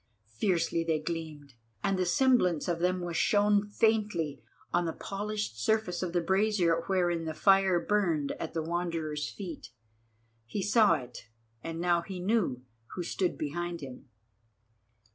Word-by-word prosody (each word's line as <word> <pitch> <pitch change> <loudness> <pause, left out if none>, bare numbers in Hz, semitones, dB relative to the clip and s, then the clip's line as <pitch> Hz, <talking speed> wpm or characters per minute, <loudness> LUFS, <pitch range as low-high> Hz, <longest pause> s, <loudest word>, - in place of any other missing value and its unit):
Fiercely 165 - +1
they 165 -1 +1
gleamed, 155 -3 -6 0.3
and 195 - +2
the 185 -1 0
semblance 215 - +3
of 170 -2 -1
them 180 +1 +1
was 175 -1 -4
shown 205 +1 +3
faintly 205 -9 +1 0.3
on 175 0 +2
the 165 - -2
polished 205 - -4
surface 215 - +1
of 180 -2 -2
the 175 0 +1
brazier 190 -2 +2
wherein 175 -3 +1
the 160 -1 -4
fire 195 -2 +4
burned 170 -6 +1
at 165 - -5
the 160 - 0
Wanderer's 165 -3 -2
feet. 180 -7 -8 0.8
He 190 - -3
saw 210 -4 +5
it, 125 -5 -8 0.4
and 165 0 -5
now 175 0 +2
he 185 +1 -7
knew 180 - 0 0.3
who 180 - -3
stood 180 +1 -1
behind 170 +3 -3
him. 130 0 -10
175 Hz, 145 wpm, -30 LUFS, 165-195 Hz, 0.8 s, saw